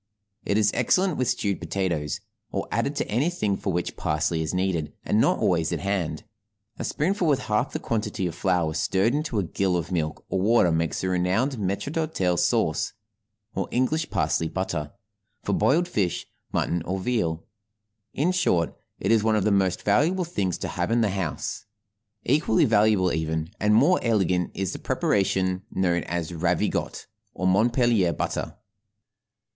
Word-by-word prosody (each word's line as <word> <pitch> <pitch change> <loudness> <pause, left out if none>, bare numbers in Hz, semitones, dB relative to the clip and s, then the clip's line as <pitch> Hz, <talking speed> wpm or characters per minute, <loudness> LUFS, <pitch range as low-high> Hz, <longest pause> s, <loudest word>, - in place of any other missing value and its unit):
It 100 - 0
is 105 -1 +3
excellent 180 +7 +2
with 130 - 0
stewed 100 -4 0
potatoes, 85 -4 -2 0.3
or - - -3
added - - 0
to - - -1
anything 120 - 0
for 95 - -3
which 90 0 -2
parsley 75 +2 0
is 80 - -2
needed, 90 -4 -1
and - - +3
not - - +3
always - - +1
at - - -2
hand; 95 -4 -2 0.6
a - - -2
spoonful 180 +3 0
with 140 -4 +2
half 105 -4 0
the - - -2
quantity 105 -4 -2
of 85 - -2
flour 90 -4 0
stirred 100 +8 +1
into 150 -5 -1
a 100 - +2
gill 90 +1 0
of 85 +1 -4
milk 80 -4 -2
or 95 - -1
water 105 -4 +4
makes 80 -1 0
the 95 - -1
renowned 95 +9 +1
maître 100 +8 -2
d'hôtel 95 - 0
sauce - - +1 0.6
(or - - -2
English 155 +6 0
parsley 80 - 0
butter) 75 -6 -3 0.5
for - - -1
boiled 170 +6 +3
fish, 95 - -1 0.3
mutton, 85 0 0
or 95 +4 -3
veal. 90 -7 -1 0.7
In 160 +6 +2
short, 90 - +1 0.2
it - - 0
is 115 -2 +5
one 110 0 +3
of 105 - +1
the 105 - +2
most 95 -2 +1
valuable 170 - +2
things 100 - -2
to - - -4
have - - -2
in 115 +1 +2
the 110 - +2
house. 95 -5 -3 0.6
Equally 140 -4 +3
valuable, 105 -4 +3
even, 80 +1 -2
and 105 0 +3
more 145 +11 +5
elegant 95 -6 +1
is 95 -2 -2
the - - -6
preparation 95 -2 0
known 90 -2 +1
as 85 -1 -3
"Ravigotte" 85 +1 -1 0.3
or 95 - -3
Montpellier 110 -1 +3
butter. - - -3
95 Hz, 165 wpm, -25 LUFS, 85-115 Hz, 0.7 s, is